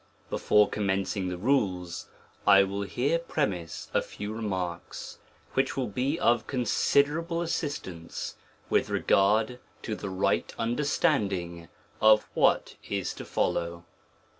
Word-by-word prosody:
Before 105 0 +4
commencing 95 -2 -1
the 90 - -4
rules, 90 -7 0 0.4
I 100 0 +8
will 100 +1 -3
here 130 +11 0
premise 90 - -2
a - - +3
few 105 +1 -6
remarks, 95 -6 -4 0.3
which 135 0 +1
will 130 - +1
bo 125 +7 -1
of 120 -1 +2
considerable 145 - +1
assistance 140 - -4 0.3
with - - +2
regard 110 +5 +2 0.2
to 110 - -3
the 105 - -5
rigliv 95 0 0
understanding 105 - 0 0.3
of 110 0 +6
what - - +2
is 100 -2 -2
to - - -8
follow. 85 0 -1
105 Hz, 115 wpm, -28 LUFS, 95-130 Hz, 0.4 s, I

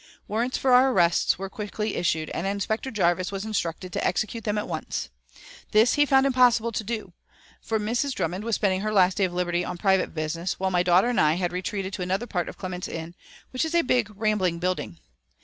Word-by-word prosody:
Warrants 235 +4 -1
for 265 - +1
our 260 +2 +6
arrests 175 -6 +3
were 195 +1 -4
quickly 210 +1 -4
issued, 160 -2 -1
and 185 - -2
Inspector 205 +5 -2
Jarvis 185 -5 +1
was 195 +1 -4
instructed 180 -4 -3
to - - -2
execute 215 +5 -1
them 210 -1 0
at 210 - -2
once. 155 - -4 0.6
This 220 +3 +5
he 290 0 +3
found 270 0 +4
impossible 245 -3 +4
to 220 - -3
do, 215 -4 -5 0.5
for 220 -1 -1
Mrs. 235 +5 -1
Drummond 180 +5 -2
was 230 -1 0
spending 190 -2 +1
her 215 +1 -1
last 190 -3 +3
day 195 - +3
of 180 - -3
liberty 175 0 0
on 180 - -5
private 190 -1 +1
business, 165 +3 -3
while 190 0 0
my 180 -1 +3
daughter 180 +5 +4
and 245 - +2
I 155 +1 +3
had 175 -1 -2
retreated 190 +1 -3
to - - -4
another 190 +5 -1
part 180 -7 -2
of - - -10
Clements 185 -1 -5
Inn, 165 +1 -6 0.4
which 255 - -1
is 320 +1 -2
a 340 - +4
big, 245 -4 +1
rambling 205 -5 0
building. 180 - -2
195 Hz, 215 wpm, -25 LUFS, 180-225 Hz, 0.6 s, our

